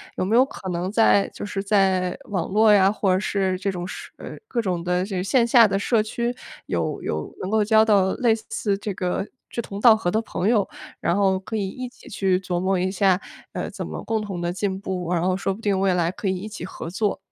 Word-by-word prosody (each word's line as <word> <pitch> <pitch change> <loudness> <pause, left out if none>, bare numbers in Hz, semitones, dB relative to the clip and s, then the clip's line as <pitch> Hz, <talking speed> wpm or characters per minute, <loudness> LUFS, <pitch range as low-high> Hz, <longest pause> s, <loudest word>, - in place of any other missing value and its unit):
有 - - -1
没 215 +5 +1
有 255 +2 +6
可 190 -8 -8
能 180 +2 -2
在 215 -2 +4
就 - - -7
是 195 -1 -3
在 190 -3 +2
网 185 -5 -1
络 215 +2 +5
呀， 195 -1 +5
或 200 -2 0
者 185 - +2
是 190 -3 0
这 195 +1 -1
种 175 -1 -5
社 - - -8
呃， - - -8
各 235 - -1
种 180 -4 -2
的 180 0 0
这 195 -1 -4
个 180 - -1
线 235 +3 +3
下 235 -1 +6
的 195 -1 0
社 215 +1 +2
区 235 +3 -2 0.3
有 - - -2
有 - - -4
能 185 - -3
够 220 0 +3
交 220 +1 +5
到 200 -3 +3
类 235 -3 +2
似 210 -2 -2
这 205 0 -4
个 185 +2 -2 0.2
志 - - -6
同 200 -2 -7
道 230 -3 +8
合 175 -5 -1
的 220 - +1
朋 200 -3 -3
友， 210 -5 +3 0.3
然 170 - +1
后 190 -2 +2
可 195 +3 -6
以 200 -3 -1
一 250 +6 -6
起 - - -18
去 190 -2 +1
琢 180 -2 -2
磨 190 +1 +1
一 185 +1 0
下， 190 -1 +3 0.3
呃， - - -3
怎 - - -6
么 - - -6
共 220 -1 -1
同 195 -4 -5
地 175 0 -2
进 190 0 -2
步， 180 -3 -4
然 170 -1 +1
后 185 0 +2
说 195 0 -1
不 195 - -6
定 200 -3 0
未 190 -1 +2
来 170 0 +1
可 200 - -5
以 190 -1 0
一 205 +4 -6
起 215 - -8
合 175 -2 -7
作。 205 +2 -1
195 Hz, 270 characters per minute, -23 LUFS, 185-215 Hz, 0.3 s, 道